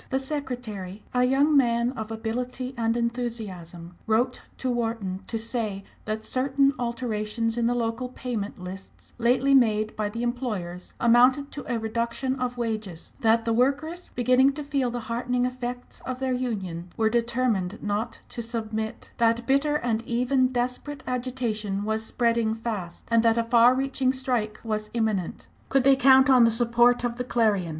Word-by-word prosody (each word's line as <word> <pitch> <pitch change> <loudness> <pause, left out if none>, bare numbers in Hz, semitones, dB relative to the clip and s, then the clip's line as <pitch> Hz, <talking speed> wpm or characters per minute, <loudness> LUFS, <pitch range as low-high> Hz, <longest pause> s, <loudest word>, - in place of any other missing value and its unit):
The 265 - +1
secretary, 245 -9 -5
a 250 0 +3
young 280 +4 +3
man 235 -2 +3
of 220 -5 -6
ability 245 +3 -4
and 230 -1 0
enthusiasm, 210 -8 -4
wrote 240 +3 +1 0.2
to 255 - -1
Wharton 225 -6 -2
to 230 - -3
say 220 -3 -3 0.2
that 215 0 -3
certain 275 +1 +2
alterations 230 -2 -2
in 235 -1 +1
the 245 - +1
local 235 +1 -2
"payment 240 -5 -4
lists" 185 +1 -10
lately 250 +4 +3
made 215 -4 +3
by 210 -1 -1
the 230 +3 -4
employers 215 -8 -4
amounted 250 +4 +4
to 285 - -6
a 235 - +1
reduction 235 +4 -2
of 250 -1 -2
wages; 215 -7 -4
that 225 0 +3
the 230 - +1
workers, 285 +8 0
beginning 255 +3 +4
to 295 +1 -5
feel 275 -3 0
the 240 0 -4
heartening 245 +2 -1
effects 250 -1 -5
of 255 -1 -4
their 260 0 -1
union, 195 -9 -3
were 220 - +3
determined 230 -4 0
not 210 +2 -2
to 235 - -5
submit; 220 -1 -4
that 230 0 +2
bitter 280 +3 +2
and 235 -5 0
even 250 +2 +2
desperate 255 +3 -3
agitation 235 -6 -2
was 220 +1 -1
spreading 230 -1 +1
fast, 210 -7 -5
and 230 0 +5
that 230 0 +3
a 230 - +2
far 235 +2 +5
reaching 265 -1 +1
strike 250 -5 -2
was 215 -2 -3
imminent. 215 -6 -1 0.2
Could 270 -1 +3
they 275 +1 +6
count 265 +1 +6
on 255 -3 +6
the 230 - +6
support 240 +1 +3
of 240 -1 -2
the 250 - -2
Clarion? 215 -8 +1
235 Hz, 165 wpm, -26 LUFS, 220-255 Hz, 0.2 s, they